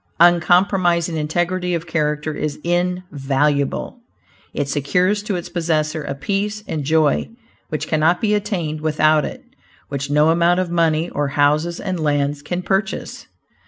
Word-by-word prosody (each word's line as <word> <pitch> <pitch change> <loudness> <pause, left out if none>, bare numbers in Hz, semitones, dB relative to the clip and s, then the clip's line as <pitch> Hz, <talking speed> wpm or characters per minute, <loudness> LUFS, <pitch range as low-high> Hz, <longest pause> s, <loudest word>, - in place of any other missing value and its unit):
Uncompromising 175 0 +3
integrity 175 +3 -1
of 165 0 -4
character 150 -2 -1
is 150 -1 -3
invaluable. 150 - -1 0.5
It 145 - -2
secures 180 +9 +1
to 205 -1 -3
its 175 - -4
possessor 160 -2 -1
a 140 - -4
peace 205 +7 -2
and 155 -2 -3
joy 155 +1 +2 0.4
which 155 - -3
cannot 160 +3 +2
be 210 -1 +1
attained 180 -7 -2
without 155 -1 +3
it - - -7 0.5
which 140 0 -4
no 150 +2 +4
amount 170 +2 +3
of 185 -2 -2
money, 165 -1 +1
or 145 0 -1
houses 150 +4 +2
and 185 -3 -3
lands 145 -1 0
can 175 +5 -4
purchase. 195 +4 -2
165 Hz, 140 wpm, -20 LUFS, 150-180 Hz, 0.5 s, no